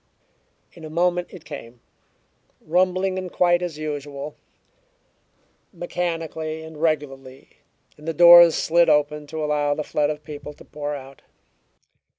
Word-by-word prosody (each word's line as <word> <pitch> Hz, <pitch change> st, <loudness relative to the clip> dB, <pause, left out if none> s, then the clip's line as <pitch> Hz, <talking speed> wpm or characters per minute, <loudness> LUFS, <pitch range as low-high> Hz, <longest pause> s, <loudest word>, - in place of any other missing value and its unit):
In 165 Hz, -, -14 dB
a 155 Hz, -, -7 dB
moment 175 Hz, +2 st, 0 dB
it 175 Hz, -4 st, -13 dB
came, 125 Hz, -5 st, -10 dB, 0.8 s
rumbling 185 Hz, +2 st, 0 dB
in 185 Hz, -1 st, -6 dB
quite 175 Hz, 0 st, +2 dB
as 175 Hz, -4 st, -4 dB
usual, 145 Hz, -1 st, -6 dB, 1.4 s
mechanically 165 Hz, -3 st, -4 dB
and 160 Hz, -1 st, -11 dB
regularly, 135 Hz, -4 st, -3 dB, 0.4 s
and 150 Hz, -, -13 dB
the -, -, +1 dB
doors 175 Hz, 0 st, +9 dB
slid 170 Hz, +1 st, +3 dB
open 150 Hz, 0 st, +1 dB
to 155 Hz, +1 st, -5 dB
allow 145 Hz, -1 st, 0 dB
the 155 Hz, -, -3 dB
flood 150 Hz, 0 st, 0 dB
of 150 Hz, 0 st, -5 dB
people 150 Hz, 0 st, -9 dB
to -, -, -17 dB
pour 145 Hz, 0 st, -5 dB
out. 135 Hz, -1 st, -11 dB
155 Hz, 135 wpm, -23 LUFS, 145-175 Hz, 1.4 s, doors